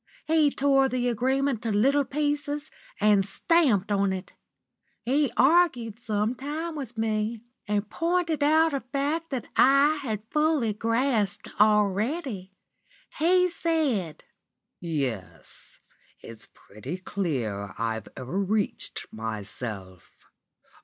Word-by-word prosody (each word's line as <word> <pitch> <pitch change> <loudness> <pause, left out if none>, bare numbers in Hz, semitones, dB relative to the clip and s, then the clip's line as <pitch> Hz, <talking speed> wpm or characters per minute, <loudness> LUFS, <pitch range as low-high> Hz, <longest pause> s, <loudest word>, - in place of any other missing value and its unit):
He 315 -2 +4
tore 270 -1 +2
the 245 -1 -1
agreement 260 +1 0
to 230 -2 -2
little 270 +8 +3
pieces, 290 +1 -2 0.3
and 205 -1 +4
stamped 215 - +2
on 200 -1 +2
it. 185 -1 -6 0.7
He 275 +3 +2
argued 265 -7 +3
some 215 -1 -1
time 305 +5 -5
with 255 -6 -7
me, 220 0 -1 0.3
and 205 0 0
pointed 335 +4 0
out 315 +2 +4
a 275 - 0
fact 285 +6 -2
that 260 -4 -3
I 280 +3 +5
had 215 -6 -4
fully 300 -8 +2
grasped 225 -2 0
already. 210 - +1 0.7
He 360 +3 +3
said: 280 - -1 0.6
"'Yes, 135 - -5 0.4
it's 115 -1 -11
pretty 125 - -8
clear 120 - -3
I've 110 -1 -3
over 130 +9 -3
reached 205 +1 -2
myself. 105 -3 -7
230 Hz, 110 wpm, -26 LUFS, 195-290 Hz, 0.7 s, I